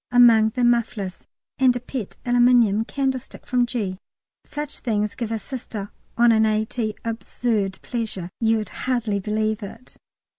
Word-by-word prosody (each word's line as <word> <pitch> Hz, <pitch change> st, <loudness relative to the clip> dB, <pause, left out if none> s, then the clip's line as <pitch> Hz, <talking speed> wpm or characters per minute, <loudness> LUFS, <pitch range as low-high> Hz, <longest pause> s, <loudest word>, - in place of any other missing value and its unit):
among 235 Hz, -3 st, +7 dB
the 250 Hz, -, +1 dB
mufflers, 230 Hz, -5 st, 0 dB, 0.3 s
and 255 Hz, -2 st, +5 dB
a -, -, -1 dB
pet 245 Hz, -3 st, -6 dB
aluminium 240 Hz, -3 st, +4 dB
candlestick 265 Hz, +1 st, -3 dB
from 245 Hz, -1 st, +2 dB
G. 205 Hz, -7 st, -3 dB, 0.4 s
Such 295 Hz, 0 st, -6 dB
things 210 Hz, -3 st, -1 dB
give 230 Hz, -2 st, -4 dB
a 225 Hz, -, 0 dB
Sister 215 Hz, -3 st, -6 dB, 0.3 s
on 240 Hz, 0 st, +6 dB
an 220 Hz, -1 st, +4 dB
A.T. 215 Hz, 0 st, 0 dB
absurd 225 Hz, -3 st, -1 dB
pleasure; 215 Hz, -7 st, -4 dB
you'd 225 Hz, -2 st, +1 dB
hardly 230 Hz, -5 st, -1 dB
believe 215 Hz, +2 st, -1 dB
it. 225 Hz, +5 st, -10 dB
225 Hz, 140 wpm, -23 LUFS, 215-245 Hz, 0.4 s, among